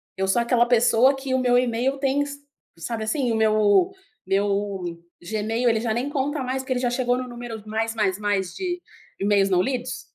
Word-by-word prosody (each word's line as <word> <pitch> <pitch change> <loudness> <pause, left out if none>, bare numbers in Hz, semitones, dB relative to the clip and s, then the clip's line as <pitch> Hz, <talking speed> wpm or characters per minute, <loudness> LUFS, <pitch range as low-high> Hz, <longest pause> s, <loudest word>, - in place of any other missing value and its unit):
Eu 190 0 -1
sou 215 +5 +2
aquela 235 0 +3
pessoa 245 +2 +4
que 270 -1 -4
o 260 - +2
meu 245 -1 +3
email 250 +2 0
tem 275 +1 +1
s 285 0 -7 0.4
sabe 220 +7 -4
assim? 240 +2 0
O - - 0
meu 215 - +3 0.3
meu 195 -3 -1 0.2
Gmail, 220 +5 -1
ele 225 - +2
já 230 -2 0
nem 250 +5 -2
conta 290 0 -1
mais, 260 +1 -2
que 260 - -8
ele 250 - -1
já 245 -1 0
chegou 245 0 0
num 255 0 -4
número 240 -3 -7
mais 225 +1 -2
mais 205 -2 0
mais 200 -3 -1
de 360 -2 -3 0.4
emails 200 -1 +3
não 180 -1 +3
lidos. 255 +2 -3
235 Hz, 200 wpm, -24 LUFS, 210-260 Hz, 0.4 s, pessoa